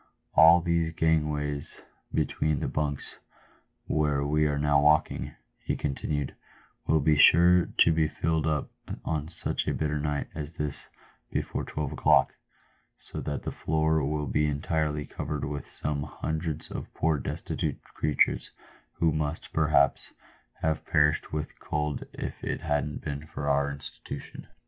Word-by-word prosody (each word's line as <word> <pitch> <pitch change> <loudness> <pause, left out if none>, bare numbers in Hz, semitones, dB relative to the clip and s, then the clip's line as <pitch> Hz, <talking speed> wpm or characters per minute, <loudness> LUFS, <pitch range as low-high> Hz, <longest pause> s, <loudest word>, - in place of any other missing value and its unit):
All 85 +2 +8
these 85 -1 +1
gangways 75 -3 0 0.3
between 75 -2 0
the - - -2
bunks, 75 -2 -3 0.7
where 75 -2 +1
we 75 +1 +2
are 75 -1 0
now 75 0 +3
walking," 75 +1 +2 0.2
he - - -2
con 75 - -1
tinued, 75 0 -2 0.3
" - - -33
will 80 -1 +3
be 75 +2 +4
sure 85 +4 +6
to 85 - +6
be 80 -1 +2
filled 80 0 0
up 75 -2 -1 0.3
on 75 -1 -1
such 85 - -1
a - - +1
bitter 75 -1 -1
night 75 -1 -1
as 75 +1 -6
this 75 -3 -4 0.4
before - - -2
twelve 75 -3 -3
o'clock, - - +4 0.6
so - - -8
that 70 - -4
the - - -3
floor 80 0 +1
will 75 +1 -1
be 75 +3 +1
entirely 75 0 -1
covered 75 -1 -4
with 70 -1 -5
some 75 -1 -2
hundreds 80 +1 -4
of - - -6
poor 80 -2 +1
destitute - - -3
creatures, 75 -2 +1 0.4
who 80 -1 +2
must, 75 +1 -3
perhaps, 75 -3 +2 0.5
have 80 -1 0
perished 75 0 +2
with 75 -1 -4
cold 75 -1 -2
if - - -6
it - - -2
hadn't 75 0 -1
been 75 +1 -5
for 70 - -5
our 70 0 +2
institution. 70 0 -8
75 Hz, 150 wpm, -28 LUFS, 75-80 Hz, 0.7 s, All